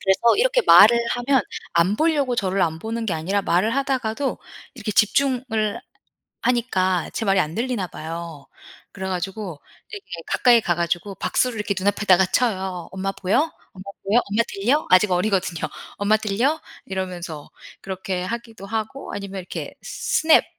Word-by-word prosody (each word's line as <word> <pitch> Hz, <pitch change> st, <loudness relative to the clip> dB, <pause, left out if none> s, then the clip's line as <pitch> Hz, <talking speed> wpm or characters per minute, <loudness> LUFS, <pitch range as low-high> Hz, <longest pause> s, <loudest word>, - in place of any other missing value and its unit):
그래서 195 Hz, +5 st, +4 dB
이렇게 -, -, +3 dB
말을 235 Hz, +4 st, +8 dB
하면 245 Hz, 0 st, +2 dB, 0.3 s
안 175 Hz, +5 st, +2 dB
보려고 290 Hz, -6 st, +2 dB
저를 195 Hz, -2 st, +1 dB
안 160 Hz, -1 st, 0 dB
보는 225 Hz, +3 st, -4 dB
게 185 Hz, -, 0 dB
아니라 190 Hz, +6 st, -1 dB
말을 200 Hz, +7 st, +1 dB
하다가도 265 Hz, -1 st, -1 dB, 0.4 s
이렇게 215 Hz, -4 st, -4 dB
집중을 230 Hz, -2 st, +1 dB, 0.6 s
하니까 190 Hz, -8 st, +1 dB
제 225 Hz, -, -2 dB
말이 195 Hz, -1 st, +3 dB
안 155 Hz, -2 st, -1 dB
들리나 230 Hz, -5 st, -1 dB
봐요. 165 Hz, -2 st, -7 dB, 0.5 s
그래가지고 190 Hz, -2 st, -4 dB, 0.3 s
이렇게 410 Hz, -2 st, -8 dB, 0.2 s
가까이 240 Hz, -2 st, +4 dB
가 175 Hz, -, 0 dB
가지고 175 Hz, +4 st, -2 dB
박수를 250 Hz, -3 st, 0 dB
이렇게 210 Hz, -1 st, -1 dB
눈앞에다가 190 Hz, -1 st, +3 dB
쳐요. 190 Hz, -8 st, -1 dB
"엄마 190 Hz, +1 st, -2 dB
보여? 250 Hz, -, 0 dB, 0.2 s
엄마 185 Hz, 0 st, -10 dB, 0.2 s
보여? 205 Hz, +5 st, +3 dB
엄마 225 Hz, +3 st, +2 dB
들려?" 245 Hz, +10 st, 0 dB
아직 185 Hz, +2 st, +5 dB
어리거든요. 180 Hz, -3 st, 0 dB, 0.4 s
"엄마 205 Hz, +1 st, +3 dB
들려?" 235 Hz, +10 st, 0 dB, 0.2 s
이러면서 180 Hz, -5 st, -5 dB, 0.3 s
그렇게 190 Hz, -1 st, -4 dB
하기도 230 Hz, -1 st, -6 dB
하고 220 Hz, +5 st, -4 dB
아니면 195 Hz, -1 st, -5 dB
이렇게 180 Hz, -, -6 dB
스냅 320 Hz, 0 st, +2 dB
200 Hz, 345 characters per minute, -22 LUFS, 185-235 Hz, 0.6 s, 말을